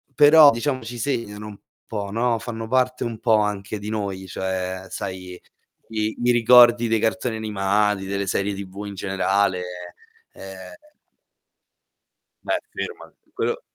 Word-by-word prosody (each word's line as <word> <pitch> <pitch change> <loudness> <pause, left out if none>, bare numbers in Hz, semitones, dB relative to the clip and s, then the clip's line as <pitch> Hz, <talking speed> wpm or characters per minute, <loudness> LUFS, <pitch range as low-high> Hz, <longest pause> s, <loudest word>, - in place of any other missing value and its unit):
però 150 +1 +8
diciamo 130 +3 -2
ci 120 +2 -7
segnano 110 -4 -3
un 105 -2 -10 0.3
po', 100 -3 -4
no, 115 +1 +1
fanno 115 -1 -6
parte 130 0 +1
un 115 -2 -4
po' 115 -3 +3
anche 105 0 -2
di 105 +1 -6
noi, 100 -3 -4
cioè, 95 0 -3
sai, 90 -1 -6 0.5
i 110 -1 -2
i 120 - +4
ricordi 120 0 +6
dei 115 -1 +1
cartoni 110 +1 -1
animati, 105 -2 0
delle 100 +1 -2
serie 100 +1 0
TV 100 +1 -7
in 100 - -7
generale, 95 0 0 0.7
ehm 95 -1 -10 1.7
Beh, - - 0
ferma! - - -7 0.2
Quello 475 +1 -2
105 Hz, 135 wpm, -23 LUFS, 95-115 Hz, 1.7 s, però